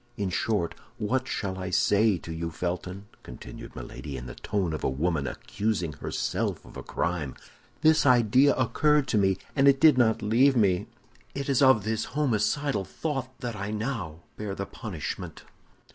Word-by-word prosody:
In 100 -3 -1
short, 90 -4 0 0.2
what 130 +4 -1
shall 95 -3 -3
I 95 0 -4
say 100 +2 +3
to 80 -1 -7
you, 85 0 -3
Felton?" 90 +4 -4 0.2
continued - - -10
Milady, 70 -3 -7
in 60 - -7
the 60 - -7
tone 95 -6 -2
of 75 - -4
a - - +2
woman 70 +1 -1
accusing 100 -5 -2
herself - - -2
of - - -14
a - - -6
crime. 85 -6 -2 0.5
"This 155 0 +5
idea 125 +2 +5
occurred 145 +4 +2
to 110 - +3
me, 95 -1 +2 0.2
and 135 -1 +5
did 150 -4 +6
not 110 -2 +3
leave 125 +6 +4
me; 95 -6 +2 0.5
it 140 0 -3
is 135 -1 +3
of 130 -6 +6
this 110 +1 -1
homicidal 135 -2 +1
thought 135 - -4
that 120 -3 -3
I 100 0 -4
now 105 - -4 0.2
bear 105 -2 -4
the 100 - -3
punishment." 95 -6 -6
105 Hz, 165 wpm, -27 LUFS, 90-130 Hz, 0.5 s, did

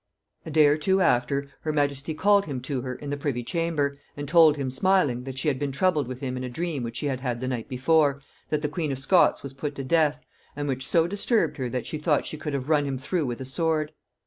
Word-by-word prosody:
A - - -4
day 155 0 +5
or 145 +1 +4
two 190 +5 +2
after, 140 -3 +1
her 155 - -1
majesty 145 0 -1
called 200 +3 +4
him 135 -4 -3
to 130 0 -3
her 130 0 -4
in 145 +2 -7
the 145 - -2
privy 140 -4 -2
chamber, 150 -2 -1 0.2
and 145 0 -5
told 160 -1 +6
him 135 -2 -2
smiling, 135 -5 +2
that 135 -1 -6
she 135 - -2
had 135 -3 +1
been 145 -1 -2
troubled 150 -1 +1
with 130 +1 -7
him 130 -2 -3
in 130 - -4
a 125 - -4
dream 160 +2 -3
which 115 0 -5
she - - -3
had 135 -3 -1
had 125 -2 -3
the 130 - -3
night 125 -2 -3
before, 140 +2 +2 0.3
that 150 0 -1
the - - +2
queen 150 0 -2
of 135 - -2
Scots 135 +7 +3
was 140 -1 -7
put 145 +2 -4
to 135 - -5
death; 150 +1 +2 0.4
and 145 0 -3
which 130 -1 -2
so 165 -1 +3
disturbed 205 +4 0
her, 130 -3 -2
that 125 -1 -3
she 155 - -5
thought 150 -2 +1
she - - -5
could 150 -1 -4
have 135 -1 -3
run 150 -2 +3
him 135 -1 -2
through 145 +3 -1
with 120 +1 -4
a - - -4
sword. 155 +3 0
145 Hz, 260 wpm, -26 LUFS, 130-155 Hz, 0.4 s, told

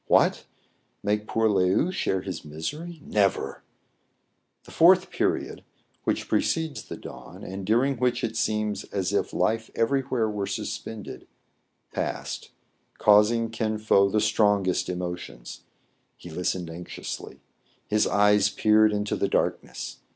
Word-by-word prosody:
What! - - +3 0.6
make 105 +1 0
poor 115 0 +2
Le 100 -3 +3
ou 95 - +2
share 95 - -1
his 95 - -5
misery! 150 - -6
Never! 100 -3 0 1.0
The - - -14
fourth - - +5
period, - - -1 0.4
which - - 0
precedes 160 -2 0
the - - -8
dawn, - - -11
and 95 0 -6
during 125 +5 +2
which 125 0 0
it 115 -1 -2
seems 105 -1 0
as 100 0 -2
if 100 - 0
life 110 0 0
everywhere 130 -1 +1
were 105 -2 -3
suspended, 110 -2 -6 0.7
passed, - - -4 0.5
causing 110 +2 +4
Kin 110 -1 -1
Fo 100 -2 +4
the 110 - +2
strong 105 -2 +3
est 90 - 0
emotions. 90 -9 -6 0.5
He 85 - -11
listened 90 0 -2
anxiously. 85 +2 -7 0.5
His 105 0 +2
eyes 105 0 +4
peered 110 0 +4
into 105 0 -1
the 100 - 0
darkness. - - -2
105 Hz, 130 wpm, -26 LUFS, 95-115 Hz, 1.0 s, fourth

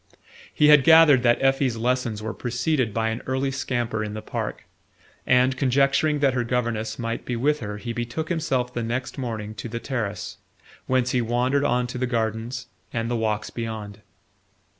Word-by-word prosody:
He 150 - +4
had 150 -2 +8
gathered 160 -3 +7
that 120 -1 +3
Effie's 135 -3 +2
lessons 120 -2 -1
were 110 -1 -3
preceded 125 0 -1
by 110 +1 0
an 115 +2 -3
early 130 +1 0
scamper 120 -4 -2
in 105 0 -5
the 110 - -5
park, - - -4 0.6
and 125 +1 +4
conjecturing 140 +3 +2
that 135 -2 +3
her 125 -1 0
governess 115 -2 -2
might 115 -1 -3
be 125 - -3
with 145 +5 +1
her 105 -2 -5
he 115 +2 -5
betook 120 +7 -4
himself 130 -7 -1
the 120 - -2
next 120 +4 -3
morning 110 -4 -4
to 115 - -7
the 115 +1 -4
terrace, 115 -7 -4 0.5
whence 130 -1 +1
he 125 - +2
wandered 125 +4 +1
on 125 -3 +1
to 125 +1 -5
the 130 - 0
gardens 115 +1 -2 0.3
and 115 0 -2
the - - +1
walks 110 -2 -1
beyond. 110 -3 -6
120 Hz, 180 wpm, -24 LUFS, 115-130 Hz, 0.6 s, had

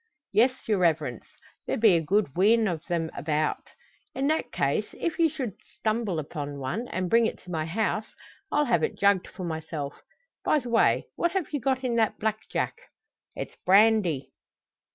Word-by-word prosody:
"Yes, 255 +5 +2
your 210 -3 +2
Reverence. 155 -9 0 0.4
There - - 0
be 220 -4 +6
a 165 - +2
good 185 -2 +1
wheen 215 +5 +4
o' 175 -3 0
them 165 -2 -1
about." 155 0 -1 0.5
"In 270 - -1
that 315 - 0
case, - - 0
if 335 0 -2
you 330 -1 +5
should 260 - -5 0.2
stumble 215 -5 -1
upon 145 -1 -5
one, 140 - -3
and 185 -4 -2
bring 230 +4 +4
it - - -5
to 180 - -10
my 160 -2 -1
house, 215 +4 -1 0.4
I'll 295 0 +3
have 240 -3 +2
it - - -1
jugged 200 -2 +3
for 185 - -8
myself. 160 -3 -5 0.4
By - - +3
the 250 -4 -4
way, 230 -1 +3
what 345 0 +1
have 385 -4 -2
you 290 - 0
got 265 0 0
in 240 -2 0
that 220 -2 +2
black 220 0 -2
jack?" - - -1 0.6
"It's - - -6
brandy." 195 -7 +4
210 Hz, 180 wpm, -27 LUFS, 165-235 Hz, 0.6 s, be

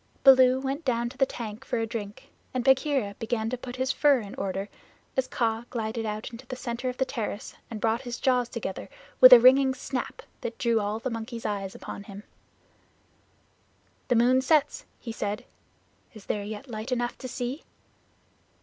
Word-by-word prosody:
Baloo 260 -1 +7
went 275 +4 -3
down 235 -3 0
to - - -14
the 270 - +4
tank 225 -1 -7
for 245 - -2
a 225 - 0
drink 210 -2 -7 0.2
and 250 - 0
Bagheera 265 -5 +2
began 225 -1 -1
to - - 0
put 245 0 -8
his 260 +1 0
fur 285 -1 +4
in 205 -3 -8
order, 195 0 -3 0.5
as 265 -1 +1
Kaa 230 -1 -1
glided 225 -1 -3
out 215 +2 -4
into 240 +2 -11
the 255 - -5
center 250 0 -3
of 250 - -6
the 265 - +1
terrace 220 -4 -4 0.2
and 225 - -6
brought 225 +3 +1
his 245 -2 -6
jaws 250 -2 +2
together 220 -5 -5 0.3
with 255 0 +10
a 250 - +12
ringing 260 +2 +6
snap 260 -1 -5 0.2
that 230 -1 -5
drew 230 -2 +2
all 205 +1 -1
the 245 +3 -4
monkeys' 230 +1 -6
eyes 200 -2 -3
upon 200 - -8
him. 200 0 -10 1.8
"The 245 - +2
moon 250 +3 +4
sets," 300 +1 +2
he 230 - -6
said. 210 -2 -3 0.7
"Is 215 - -12
there 205 - -2
yet 215 +5 -7
light 225 +1 -6
enough 240 -1 -1
to 260 - -6
see?" 250 +3 -4
240 Hz, 185 wpm, -27 LUFS, 220-260 Hz, 1.8 s, a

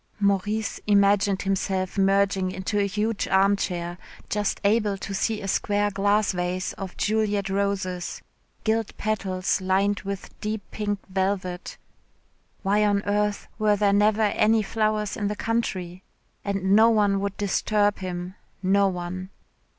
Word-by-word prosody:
Maurice 205 +2 0
imagined 200 -1 +3
himself 190 -1 -1
merging 195 -1 +2
into 190 +2 -2
a 200 - +2
huge 210 +2 -1
armchair, 190 -3 +1 0.3
just 205 -1 -1
able 205 -1 +2
to 195 - -6
see 210 +2 -1
a - - -4
square 205 +1 +1
glass 205 +2 +2
vase 180 0 -2
of 190 -2 -8
Juliette 205 -2 0
roses 195 -3 -2 0.4
gilt 220 -1 0
petals 190 -3 -1
lined 195 +2 +1
with 200 -1 -6
deep 215 -1 -3
pink 205 -1 -2
velvet. 190 -2 -2 0.9
Why 205 +2 +3
on 205 -1 +2
earth 205 0 0
were 210 -1 +3
there 200 -1 +2
never 210 +2 +3
any 215 +1 +3
flowers 215 0 0
in 205 -2 -2
the 210 - -2
country? 185 -6 -2 0.4
And 195 -1 +1
no 225 +2 +7
one 205 -3 +3
would 200 0 -3
disturb 205 +1 +1
him 180 -1 -5 0.3
no 200 +1 +4
one. 185 0 -4
200 Hz, 135 wpm, -25 LUFS, 190-210 Hz, 0.9 s, no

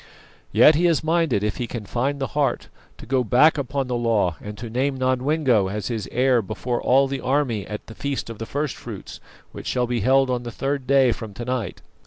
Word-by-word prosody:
Yet 120 +9 +7
he 170 +4 +3
is 165 -2 +1
minded, 160 -9 +1
if 105 - -1
he 120 - -3
can 115 -2 -6
find 135 +7 -1
the 135 - -2
heart, 140 -4 0 0.3
to - - -11
go 130 +1 +1
back 145 +7 +4
upon 135 0 -2
the 125 - -4
law 110 -8 +1
and 105 0 -8
to 120 - -6
name 130 +4 -1
Nodwengo 130 -3 +2
as 105 +4 -4
his 115 -3 -4
heir 125 -1 +3
before 120 +4 -3
all 135 +2 +4
the 135 -1 -4
army 125 -6 0
at 105 0 -6
the 110 - -11
feast 140 +3 -3
of 115 -2 -8
the 115 - -5
first 145 -1 -2
fruits, - - -9 0.3
which - - -9
shall 125 -1 +1
be 120 0 -1
held 130 +4 +3
on 125 -1 -1
the 120 - -6
third 135 +2 -3
day 135 -2 +4
from 110 -3 -6
to 120 - -6
night. 125 -6 -3
125 Hz, 225 wpm, -23 LUFS, 115-140 Hz, 0.3 s, Yet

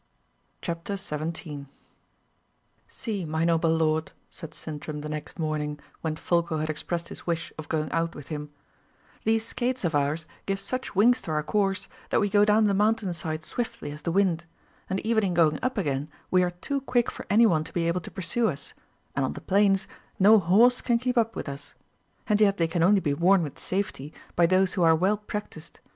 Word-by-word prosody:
CHAPTER 170 +3 -3
17 155 -4 -5 1.2
"See, 210 -6 -4
my 160 0 -1
noble 165 -1 +2
lord," 160 -1 +1 0.2
said 160 -3 -10
Sintram 150 -1 -6
the 150 - -5
next 155 +1 -6
morning, 150 -2 -2 0.2
when 160 -1 -2
Folko 170 0 0
had 155 0 -1
expressed 170 +2 -4
his - - -8
wish 165 -2 -2
of 155 - -9
going 155 -1 -1
out 165 0 -1
with 145 - -10
him, 150 -1 -5 0.8
"these 220 0 +2
skates 255 +1 -2
of 170 - 0
ours 145 +3 0 0.2
give 195 0 0
such 255 +2 -4
wings 240 +6 +5
to 180 - -8
our 155 -1 0
course, 195 +2 0 0.2
that - - +3
we 205 -2 +1
go 205 0 +5
down 210 +1 +4
the 205 - +3
mountain 210 -1 +2
side 155 -2 -4
swiftly 230 -6 -4
as 150 +1 -8
the 170 - -2
wind; 175 -3 +2 0.4
and 190 +1 0
even 220 -1 +2
in 185 -3 0
going 155 -3 +3
up 255 -1 -1
again 145 -5 -1 0.2
we 185 - +5
are 180 - +2
too 270 +11 -3
quick 245 -3 +1
for - - -9
any 220 +4 +6
one 160 -7 +3
to - - -9
be 170 -1 0
able 175 +2 0
to - - -8
pursue 195 +6 0
us, 140 -4 -6 0.4
and 140 - +1
on 130 - -1
the - - -7
plains 195 0 +3 0.3
no 210 +3 +7
horse 215 +8 +4
can 240 -2 +2
keep 250 +1 -1
up 230 -1 +2
with - - -5
us; 140 0 -8 0.5
and 210 -1 +2
yet 200 -1 +4
they 165 - +2
can 165 +1 -1
only 195 +3 +5
be 145 -5 0
worn 175 +4 +4
with 145 - -6
safety 185 -7 -3 0.2
by 170 -1 +5
those 185 +1 +3
who 185 - -1
are 165 -1 +6
well 190 +6 +2
practised. 210 -6 -7
175 Hz, 205 wpm, -27 LUFS, 155-205 Hz, 1.2 s, no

